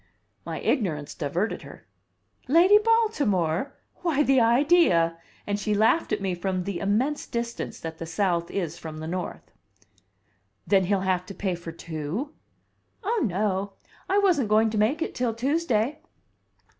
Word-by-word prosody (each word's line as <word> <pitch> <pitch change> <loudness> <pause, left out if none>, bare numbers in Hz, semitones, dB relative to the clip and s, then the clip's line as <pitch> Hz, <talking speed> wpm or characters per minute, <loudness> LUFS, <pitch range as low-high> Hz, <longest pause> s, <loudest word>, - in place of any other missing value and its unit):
My - - -4
ignorance 155 - -1
diverted 170 +8 -2
her. - - -13 0.6
"Lady 355 +9 +6
Baltimore? 285 - +1 0.2
Why, 310 -5 +1
the 270 -2 +4
idea!" 230 - +4 0.3
And 205 0 -1
she 210 0 0
laughed 220 +10 +2
at - - -1
me 190 -2 0
from 185 +1 -2
the 195 -1 -4
immense 230 +9 0
distance 235 0 -4
that 160 0 -6
the 165 - -5
South 170 -1 0
is 175 -4 -3
from 155 -1 -7
the 155 - -6
North. 180 +2 -5 1.1
"Then 190 -2 +3
he'll 195 +1 +1
have 185 -1 0
to 195 - -8
pay 190 -3 -1
for 170 -1 -7
two?" 165 - -5 0.7
"Oh, 445 +3 0
no! 200 -1 -1 0.4
I 390 - +3
wasn't 350 - +3
going 220 +1 +4
to 215 - -2
make 275 +10 +2
it - - -5
till 240 -3 -1
Tuesday. 270 -1 0
205 Hz, 150 wpm, -26 LUFS, 175-275 Hz, 1.1 s, Lady